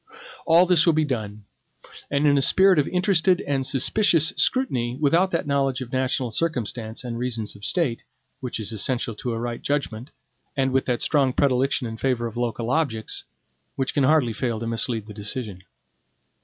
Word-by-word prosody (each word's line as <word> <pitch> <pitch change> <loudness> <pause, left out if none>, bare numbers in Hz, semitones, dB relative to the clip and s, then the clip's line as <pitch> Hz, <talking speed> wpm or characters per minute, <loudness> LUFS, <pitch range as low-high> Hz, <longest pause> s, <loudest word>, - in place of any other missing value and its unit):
All 170 +2 +6
this 175 -2 +4
will 170 - +5
be 155 0 +2
done; 110 -6 -4 0.7
and 140 +1 +1
in 145 -1 +5
a 140 - +3
spirit 190 +4 +5
of 145 - +1
interested 180 -1 +2
and 140 -2 -1
suspicious 165 - +2
scrutiny, 125 - +1
without 165 +6 +3
that 170 - -1
knowledge 135 -2 0
of 130 -1 -8
national 130 -1 0
circumstances 115 -6 -2
and 120 -2 -5
reasons 115 -4 -3
of 100 - -15
state, 130 - 0 0.4
which 125 -3 -5
is 110 0 -4
essential 120 +3 -1
to 120 +3 -5
a 115 - -3
right 120 0 -4
judgment, 135 -3 -3 0.5
and 135 -1 +1
with 135 0 +1
that 125 -2 -1
strong 140 -4 +2
predilection 135 -1 +1
in 110 -1 -6
favor 125 -1 -1
of 115 -1 -6
local 120 0 -2
objects, 125 -8 -1 0.5
which 135 0 -2
can 145 - +1
hardly 130 -4 +3
fail 115 +1 -2
to 115 - -5
mislead 115 -1 -2
the 105 - -10
decision. 105 -2 -6
130 Hz, 180 wpm, -24 LUFS, 115-150 Hz, 0.7 s, All